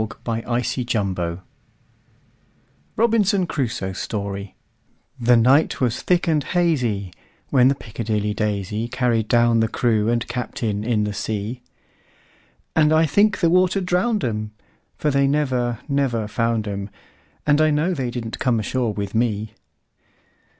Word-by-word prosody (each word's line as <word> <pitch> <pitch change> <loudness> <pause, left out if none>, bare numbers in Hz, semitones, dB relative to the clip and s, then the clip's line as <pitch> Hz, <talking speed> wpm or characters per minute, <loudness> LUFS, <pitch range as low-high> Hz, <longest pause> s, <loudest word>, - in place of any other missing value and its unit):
Carryl1841–1920 115 -6 -2 1.5
Robinson 210 -4 +2
Crusoe's 115 - -3
Story 100 -1 -4 0.6
THE 120 0 +4
NIGHT 130 +7 +3
was 120 -3 0
thick 180 -1 +1
and 155 -3 +2
hazyWhen 125 - 0
the 140 - +1
"Piccadilly 105 -3 -3
Daisy"Carried 110 +3 -1
down 120 0 +3
the 110 - +2
crew 110 -2 +1
and 120 0 0
captain 115 -3 -3
in 110 -2 +1
the 105 0 -2
sea; 110 +4 -4 1.1
And 155 -1 +4
I 160 +1 +4
think 200 +6 +2
the 170 - +4
water 185 +2 +3
drowned 190 +4 0
'em; 110 -2 -3 0.4
For 150 - 0
they 140 0 +3
never, 130 -5 0
never 135 -7 0
found 115 0 -1
'em, 100 0 -4 0.6
And 150 +1 +4
I 155 - +4
know 155 +5 +1
they 130 -7 -2
didn't 120 -2 -5
come 125 -3 +1
ashore 115 +1 -1
with 100 -1 -4
me. 110 -2 -1
120 Hz, 125 wpm, -22 LUFS, 105-145 Hz, 1.5 s, THE